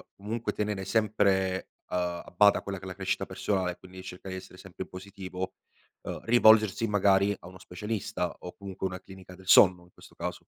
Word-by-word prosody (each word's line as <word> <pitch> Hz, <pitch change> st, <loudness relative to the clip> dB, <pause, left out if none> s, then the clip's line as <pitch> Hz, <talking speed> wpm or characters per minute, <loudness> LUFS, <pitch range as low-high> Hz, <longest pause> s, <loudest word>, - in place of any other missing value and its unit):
comunque 110 Hz, +3 st, -3 dB
tenere 105 Hz, -2 st, -2 dB
sempre, 95 Hz, -3 st, +1 dB, 0.2 s
uhm, -, -, -1 dB, 0.3 s
a -, -, -15 dB
bada 100 Hz, +3 st, +5 dB
quella 100 Hz, -1 st, -5 dB
che 95 Hz, -, -10 dB
è -, -, -6 dB
la 95 Hz, -, -6 dB
crescita 95 Hz, 0 st, -1 dB
personale 95 Hz, -3 st, -1 dB
e 90 Hz, -, -10 dB
quindi 95 Hz, 0 st, -12 dB
cercare 95 Hz, +1 st, -7 dB
di -, -, -4 dB
essere 90 Hz, -, -14 dB
sempre 95 Hz, 0 st, -8 dB
positivo, 95 Hz, -1 st, -7 dB, 0.5 s
uhm, -, -, -5 dB
rivolgersi 110 Hz, -2 st, +5 dB
magari 100 Hz, -1 st, +3 dB
a -, -, -13 dB
uno 95 Hz, +1 st, -11 dB
specialista 95 Hz, +1 st, -3 dB
o 90 Hz, -, -9 dB
comunque 95 Hz, -1 st, -4 dB
una 90 Hz, 0 st, -7 dB
clinica 95 Hz, -1 st, -12 dB
del 95 Hz, 0 st, -16 dB
sonno 90 Hz, -2 st, +7 dB
in 90 Hz, -, -21 dB
questo -, -, -17 dB
caso? -, -, -5 dB
95 Hz, 195 wpm, -29 LUFS, 95-105 Hz, 0.5 s, sonno